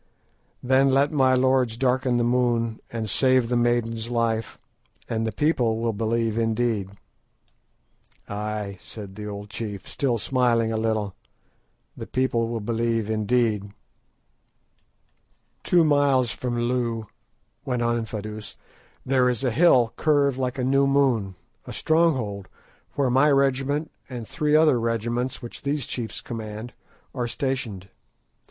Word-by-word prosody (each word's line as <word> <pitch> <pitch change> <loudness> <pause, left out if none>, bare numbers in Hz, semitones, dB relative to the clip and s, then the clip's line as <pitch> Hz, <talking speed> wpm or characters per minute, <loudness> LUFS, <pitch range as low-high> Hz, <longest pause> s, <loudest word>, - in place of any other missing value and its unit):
"Then 130 +2 +4
let 135 +2 +3
my 130 -3 +3
lords 130 -3 +2
darken 130 -1 +1
the 120 - +2
moon, 120 -2 +1
and 115 -2 -3
save 130 +1 +3
the 125 - +1
maiden's 120 -1 0
life, 115 -2 -1 0.5
and 115 0 -1
the - - -1
people 125 -7 +1
will 115 0 -1
believe 115 +1 0
indeed." 115 -3 0 1.4
"Ay," 105 -1 -4
said 95 +4 -9
the 105 +1 -7
old 105 0 -7
chief, 105 -3 -5
still 130 -4 0
smiling 115 -2 +1
a - - 0
little, 110 -3 -1 0.8
"the - - -8
people 125 -3 0
will 115 -1 -3
believe 115 0 -1
indeed." 110 -2 0 1.9
"Two 175 -2 +4
miles 140 -5 +3
from 120 -1 -3
Loo," 120 -2 -1 0.6
went 125 -2 -1
on 120 0 +1
Infadoos, 110 -1 -6 0.5
"there 130 -1 +3
is 125 0 -1
a 130 - +1
hill 125 -5 +4
curved 145 -3 +2
like 130 0 -2
a 130 - -1
new 135 +2 +3
moon, 130 -9 +2 0.3
a - - -6
stronghold, 130 - +1 0.5
where 135 -3 +1
my 135 +4 +4
regiment, 140 +2 +1 0.2
and 120 -4 -6
three 150 -1 +1
other 155 -5 +5
regiments 120 +3 -2
which 120 - -8
these 140 -2 -2
chiefs 115 -3 -4
command, 110 0 -7 0.4
are 125 -2 -2
stationed. 120 - -3
120 Hz, 135 wpm, -24 LUFS, 110-130 Hz, 1.9 s, other